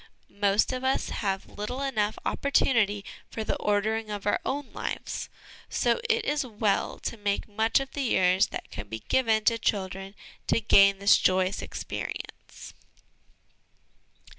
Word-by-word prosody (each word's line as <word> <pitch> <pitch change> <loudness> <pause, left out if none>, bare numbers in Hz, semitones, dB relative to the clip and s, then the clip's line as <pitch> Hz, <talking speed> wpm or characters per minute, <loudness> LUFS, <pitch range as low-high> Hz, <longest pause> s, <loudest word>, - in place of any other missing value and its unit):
Most 205 +5 +3
of 255 0 -4
us 265 +1 +1
have 195 -2 -2
little 250 +6 -3
enough 215 -6 0
opportunity 220 -7 +2 0.2
for 220 - -4
the - - -1
ordering 215 +2 0
of 205 -1 -5
our 205 - +2
own 280 0 -3
lives, - - -4 0.4
so - - +1
it 455 -1 +2
is 295 -1 +1
well 210 -4 -1
to 230 - -4
make 205 -1 -1
much 220 +3 +2
of 270 0 -5
the 285 - -3
years 185 -7 +3
that - - -7
can 105 - -7
be 110 +1 -6
given 225 -4 +3
to 230 +1 +3
children 195 -1 -2 0.3
to - - +3
gain 200 -2 +6
this 200 +1 +5
joyous 185 +1 +2
experience. - - -7
210 Hz, 145 wpm, -27 LUFS, 195-250 Hz, 0.4 s, gain